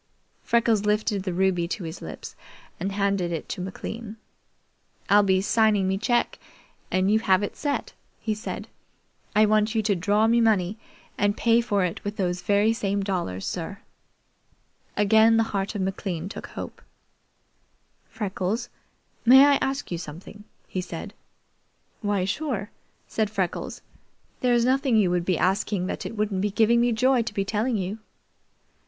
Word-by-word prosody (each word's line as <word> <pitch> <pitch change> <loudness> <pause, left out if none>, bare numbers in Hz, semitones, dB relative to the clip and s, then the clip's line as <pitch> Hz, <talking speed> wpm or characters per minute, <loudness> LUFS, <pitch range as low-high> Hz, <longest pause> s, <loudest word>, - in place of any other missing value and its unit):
Freckles 230 -3 +2
lifted 210 -1 +1
the 185 -1 -3
ruby 180 -1 +1
to 190 +2 -4
his 165 +1 -7
lips - - -8 0.4
and 195 - -2
handed 195 -3 0
it 165 - -4
to 190 - -4
McLean. 215 +4 -6 0.9
"I'll 205 +1 +7
be 190 -2 +2
signing 215 -2 +3
me 190 0 0
cheque 240 +3 0 0.5
and 185 +2 +2
you 220 - +4
have 195 -2 +3
it 205 - -4
set," 290 -1 -2 0.3
he 220 - -1
said. 215 +4 -6 0.7
"I 215 +1 +6
want 215 +1 +2
you 220 - +2
to 205 -1 +2
draw 205 +5 +2
me 235 +1 +4
money 210 -2 +2 0.4
and 205 +1 +2
pay 235 0 +4
for 205 -5 +1
it 175 - -4
with 205 +1 -4
those 180 -2 -1
very 205 +2 +3
same 200 -2 -1
dollars, 175 - -2
sir." 185 +3 -4 1.2
Again 220 +2 +5
the 225 - +4
heart 195 +2 -2
of 200 - -1
McLean 190 -3 -3
took - - -7
hope. - - -8 1.3
"Freckles, 205 +2 -3 0.5
may 265 +3 +8
I 285 -1 +5
ask 270 -4 -2
you 170 - -2
something?" 175 +6 -10 0.2
he 185 - -3
said. 180 +3 -7 0.9
"Why, 205 -3 0
sure," 215 -2 -3 0.4
said 215 -2 -1
Freckles. 190 -4 -3 0.6
"There's 240 -2 +3
nothing 265 -1 +2
you 195 -5 +3
would 175 -1 0
be 185 -3 +1
asking 190 +1 0
that - - -4
it 225 - -8
wouldn't 205 -3 0
be 210 - +1
giving 225 +3 +3
me 240 0 +3
joy 250 +2 +3
to 230 -2 -4
be 195 - 0
telling 220 +3 0
you." 195 +3 -3
205 Hz, 160 wpm, -25 LUFS, 190-225 Hz, 1.3 s, may